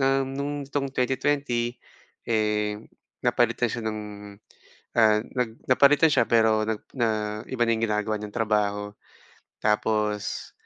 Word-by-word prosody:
um, 135 0 +2
no'ng 140 +1 -3
nitong 140 0 -2
2020 125 -2 0 0.5
eh, 105 -2 0 0.4
napalitan 120 0 +2
siya 115 0 -4
ng, 110 -1 -2 1.0
ah, 110 -1 +5
nag 125 0 -2 0.2
napalitan 145 +5 +6
siya - - +4
pero 110 -2 +3
nag 110 -1 -2 0.2
na 120 -2 +2 0.4
iba 120 -2 +2
na - - +4
yung 115 - 0
ginagawa 105 0 -1
niyang 105 -1 -7
trabaho. 105 -2 0 0.7
Tapos, 105 -1 0
115 Hz, 125 wpm, -26 LUFS, 105-130 Hz, 1.0 s, napalitan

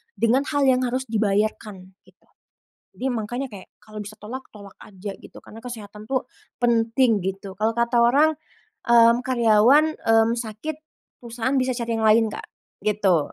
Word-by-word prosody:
dengan 245 +4 +2
hal 285 -1 +1
yang 255 0 +3
harus 255 +2 -2
dibayarkan, 210 -2 -1 0.2
gitu. - - -26 0.7
Jadi 260 - -3
makanya 240 +5 -3
kayak 205 -7 -12
kalau 215 -1 -9
bisa 210 +1 -11
tolak, 250 +6 -7
tolak 200 -2 -13
aja 195 0 -8
gitu - - -14
karena 225 +1 -13
kesehatan 215 -3 -9
tuh 260 -2 -1 0.4
penting 230 -1 +2
gitu, 195 +1 -5
kalau 220 +2 +1
kata 235 0 +1
orang, 290 +6 +4 0.6
mmm, 235 0 +6
karyawan, 250 +6 +4
mmm, 225 0 +3
sakit 230 +7 -5 0.5
perusahaan 240 +3 -3
bisa 255 0 0
cari 235 -1 -2
yang 220 - +1
lain 225 +1 +5
Kak, - - -8 0.4
gitu. 195 -7 +1
225 Hz, 155 wpm, -23 LUFS, 210-250 Hz, 0.7 s, mmm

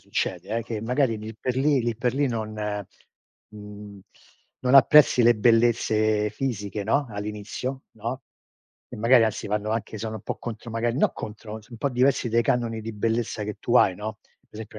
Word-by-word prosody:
succede 90 +1 -3
eh, 115 - -1
che 110 -2 -4
magari 125 +1 +1
lì 110 +1 -8
per 125 +2 -2
lì 140 +1 +2
lì 120 -1 -1
per 125 0 0
lì 145 0 +2
non 110 -3 -3 1.0
mhmm, 105 -1 -11 0.6
non 130 +1 +2
apprezzi 135 -1 +7
le 120 0 +5
bellezze 110 -2 +3
fisiche, 105 -4 -3
no, 140 +7 +1
all'inizio, 105 +6 -5
no, 115 +4 -5 0.7
e - - -9
magari 115 +2 +5
anzi 110 -1 -2
vanno 105 +1 -1
anche 110 -1 -3
sono 110 +1 -4
un 110 - -9
po' - - -4
contro 115 0 -7
magari 115 +3 -1
no - - +3
contro, 105 0 -8
son 110 - -20
un 115 - -9
po' 140 - 0
diversi 125 0 +2
dai 115 +1 +2
canoni 115 -2 0
di 110 +1 -6
bellezza 110 0 -1
che 105 0 -5
tu 120 - +2
hai, 95 - +5
no. 110 +2 -6
Per - - -36
esempio, 110 -1 -9
115 Hz, 185 wpm, -25 LUFS, 105-120 Hz, 1.0 s, apprezzi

